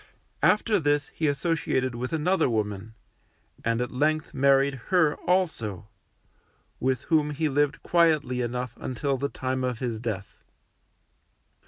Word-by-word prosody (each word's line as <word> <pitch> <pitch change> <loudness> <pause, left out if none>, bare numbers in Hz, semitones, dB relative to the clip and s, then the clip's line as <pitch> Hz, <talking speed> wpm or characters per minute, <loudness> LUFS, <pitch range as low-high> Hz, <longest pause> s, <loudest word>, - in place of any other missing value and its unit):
After 210 0 +3
this 145 -2 +1
he 160 - -2
associated 140 -4 0
with 125 +2 -4
another 165 0 +2
woman, 105 -1 -3 0.7
and 115 0 +1
at 125 - -3
length 155 +4 0
married 140 +1 +4
her 175 -5 +3 0.2
also, 115 - 0 0.9
with 130 -1 0
whom 155 -3 +2
he 150 +2 -1
lived 145 0 0
quietly 155 -7 +2
enough 125 0 -3
until 135 +2 -2
the 140 +2 -2
time 130 0 -3
of 125 -2 -1
his 115 -2 -3
death. 110 -4 -5
135 Hz, 130 wpm, -26 LUFS, 120-155 Hz, 0.9 s, married